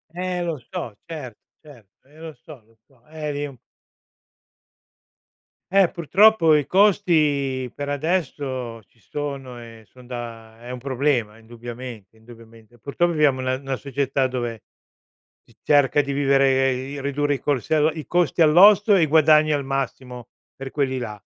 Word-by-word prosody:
Eh 180 0 -3
lo 165 -3 -3
so 160 - -6
certo 150 -9 -8 0.2
certo, 130 -6 -19
eh 150 +2 -21
lo 160 -1 -9
so 145 -8 -13
lo 115 0 -29
so. 125 -4 -29
Eh 155 -1 -5
lì 145 0 -3
un 135 -3 -10
p - - -41 2.1
Eh 195 -2 +5
purtroppo 175 -1 +4
i 145 -2 +1
costi 150 - +2
per 145 0 -5
adesso 140 -6 -3
ci 115 - -33
sono 135 +1 -6
e 115 -1 -13
son 125 -1 -18
da 115 -2 -8
è 120 +1 -9
un 125 - -6
problema 130 -4 -1
indubbiamente 115 -2 -10
indubbiamente. 115 0 -17
Purtroppo 170 +7 -1
viviamo 150 -4 +2
in - - -5
una 130 0 0
una 135 0 -4
società 135 0 -2
dove 120 -4 -4 0.8
si - - -25
cerca 145 -1 +3
di 140 -1 -2
vivere, 135 -1 +2
di 135 +3 -6
ridurre 145 +1 -1
i - - -6
cos 140 -5 -2
ehm, 155 0 +3
i 155 -1 -8
costi 175 -2 0
all'osso 200 +6 +6
e 180 - +4
i - - +4
guadagni 155 0 +4
al 145 -2 -1
massimo 130 -2 -5 0.3
per 135 0 -7
quelli 135 -3 -1
là. 105 -4 -6
135 Hz, 160 wpm, -22 LUFS, 120-155 Hz, 2.1 s, all'osso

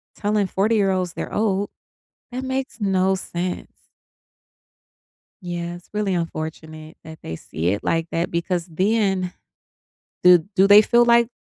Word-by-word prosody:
telling 205 -1 0
forty-year-olds 195 -3 +1
they're - - -6
old. 205 -2 0 0.6
That 255 +2 -4
makes 260 -1 -4
no 190 -1 +2
sense. 180 -1 -4 1.7
Yeah, 175 -1 -5
it's 175 - -15
really 210 -2 -1
unfortunate 160 -1 -6
that 160 0 -11
they 80 - -6
see 80 +1 -3
it 100 +2 -2
like 165 0 0
that, 165 +1 -1
because 170 0 -1
then, 190 +1 0 0.9
do 180 -1 +8 0.2
do 195 0 +5
they 205 +1 +9
feel 240 +2 +4
like 235 -1 +4
185 Hz, 130 wpm, -22 LUFS, 170-210 Hz, 1.7 s, they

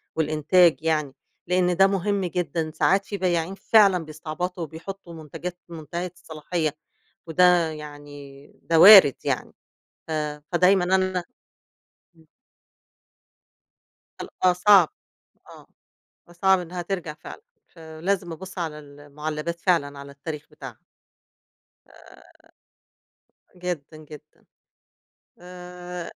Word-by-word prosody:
والإنتاج 160 +2 +3
يعني 150 -4 0 0.3
لأن 180 0 +1
ده 195 0 +6
مهم 195 0 -1
جدًا، 170 -2 -3
ساعات 195 +5 +1
في 200 - -5
بياعين 175 0 -1
فعلًا 195 -4 +3
بيستعبطوا، 160 +3 -5
وبيحطوا 170 +3 -9
منتجات 165 +3 -8
منتهية 170 +2 -6
الصلاحية، 155 -1 -4 0.5
وده 175 -1 +3
يعني 145 -2 -11 0.2
ده 165 -1 +2
وارد 190 - +10
يعني، - - -3 0.5
ف - - -10 0.4
فدايمًا 180 +1 +4
أنا 185 -1 0 0.9
إمم. 160 -1 -23 2.0
ال - - -8 0.2
آه 180 - +5
صعب، 180 -1 +5 0.6
آه، - - -14 0.6
فصعب 190 +2 +2
إنها 175 +1 -6
ترجَع 175 -4 -4
فعلًا، 435 - -12 0.3
فلازم 170 +2 -4
أبُصّ 190 +3 -9
على 160 -3 -4
المعلّبات 150 +3 -7
فعلًا 145 -6 0
على 140 0 -10
التاريخ 150 +1 -8
بتاعها. - - -11 1.1
آآ، - - -19 1.6
جدًا، 160 -4 -5
جدًا، 150 0 -14 1.0
آآ 180 -1 -9
170 Hz, 100 wpm, -24 LUFS, 155-180 Hz, 2.0 s, وارد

